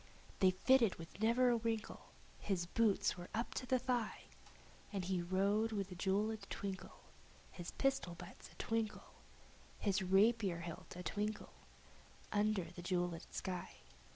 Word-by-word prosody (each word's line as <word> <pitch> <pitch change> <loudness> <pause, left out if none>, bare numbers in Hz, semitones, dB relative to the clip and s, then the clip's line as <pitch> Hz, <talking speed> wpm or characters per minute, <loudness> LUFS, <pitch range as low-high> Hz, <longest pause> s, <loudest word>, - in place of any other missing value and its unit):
They 190 - +7
fitted 225 +4 +4
with 165 +3 -10
never 245 +3 +5
a 235 - +3
wrinkle; 225 -1 -3 0.3
his 185 -4 -1
boots 210 +3 +2
were 175 - -8
up 230 +2 -1
to 255 - -3
his 255 -1 +2
thigh! 245 -4 0 0.7
And 195 -4 -2
he 185 -1 0
rode 200 +5 +2
with 200 -3 -2
a - - -5
jeweled 205 +3 0
twinkle 195 -2 -5 0.5
His 175 -1 -6
rapier 265 -11 +1
hilt 175 +2 -10
a - - -18
twinkle 225 -1 -1 0.7
His 205 - +1
pistol 190 -1 0 0.2
butts 180 -8 -2
a 180 - -5
twinkle, 210 +3 -2 0.8
under 210 -3 +2
the 175 - -8
jeweled 175 -2 -1
sky. 180 -2 -4
200 Hz, 145 wpm, -38 LUFS, 180-225 Hz, 0.8 s, They